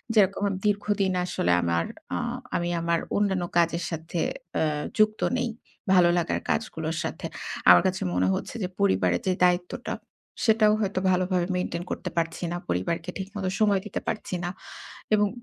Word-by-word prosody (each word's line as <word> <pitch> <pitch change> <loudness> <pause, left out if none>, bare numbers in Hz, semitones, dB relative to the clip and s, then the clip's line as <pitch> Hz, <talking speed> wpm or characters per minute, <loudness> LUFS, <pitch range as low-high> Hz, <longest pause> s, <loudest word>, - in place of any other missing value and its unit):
যেরকম, 200 -1 +4 0.2
দীর্ঘদিন 205 -1 +1
আসলে 130 - 0
আমার, 85 0 +1 0.3
আ - - 0 0.4
আমি 175 0 0
আমার 170 0 +1 0.2
অন্যান্য 190 -3 +1
কাজের 170 0 +2
সাথে 165 +1 -4 0.4
এ - - +4 0.3
যুক্ত 215 0 +3 0.2
নেই। 245 -1 0 0.4
ভালো 175 -2 +6
লাগার 170 - 0
কাজগুলোর 160 -7 -1
সাথে। - - -4 0.4
আমার 90 0 +9
কাছে 185 - -2
মনে 90 +1 +2
হচ্ছে 225 - -4
যে, 180 - 0
পরিবারের 95 -2 +2
যে 185 - +3
দায়িত্বটা, 180 +6 +1 0.5
সেটাও 220 -2 +5
হয়তো, 195 -2 0
ভালোভাবে 180 -1 +1
মেইনটেইন 180 -1 -2
করতে 180 - -3
পারছি 165 +1 -1
না। 175 - -2
পরিবারকে 95 - -1
ঠিকমতো 195 0 -4
সময় 205 -2 +4
দিতে 210 - -3
পারছি 200 - -2
না। 175 - -1 0.6
এবং 210 -1 +4
180 Hz, 150 wpm, -26 LUFS, 165-205 Hz, 0.6 s, আমার